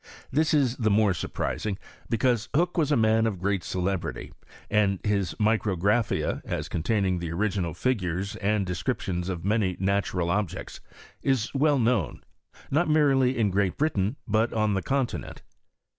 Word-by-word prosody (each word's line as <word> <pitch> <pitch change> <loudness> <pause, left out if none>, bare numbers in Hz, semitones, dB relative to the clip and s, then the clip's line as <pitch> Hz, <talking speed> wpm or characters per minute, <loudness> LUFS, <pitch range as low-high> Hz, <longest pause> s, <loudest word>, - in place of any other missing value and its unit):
This 155 +2 +2
IB 130 -4 +2
the 110 -2 +2
mare 105 -1 +3
surprising, 100 +2 -3 0.3
because 120 0 +1
Hook 175 +3 +2
was 155 -4 +2
ft 145 - +3
initn 110 +1 +3
of 105 -4 -2
i^reat 100 +1 0
celebrity: 95 0 -3 0.3
and 100 -2 +2
his 100 -4 0
Micrograpfaia, 105 0 +1
as - - -3
contiuninfc 95 0 0
tli« 85 - -3
ori^Dul 95 -3 -1
figures 100 -6 -1
and 105 0 0
detcriptions 90 -2 -2
of 90 -3 -4
muiy 100 -2 0
naturol 95 -2 0
objecu, 105 -4 -3 0.4
is 130 -5 0
well 145 +1 +3
known, 115 - 0 0.5
not 155 +4 +2
merely 135 -4 +3
in 105 -4 +2
Great 95 0 0
BriUin, 130 -7 0
but 110 +2 +2
on 110 -2 +1
the 95 - 0
continent. 135 0 -2
105 Hz, 145 wpm, -26 LUFS, 95-125 Hz, 0.5 s, mare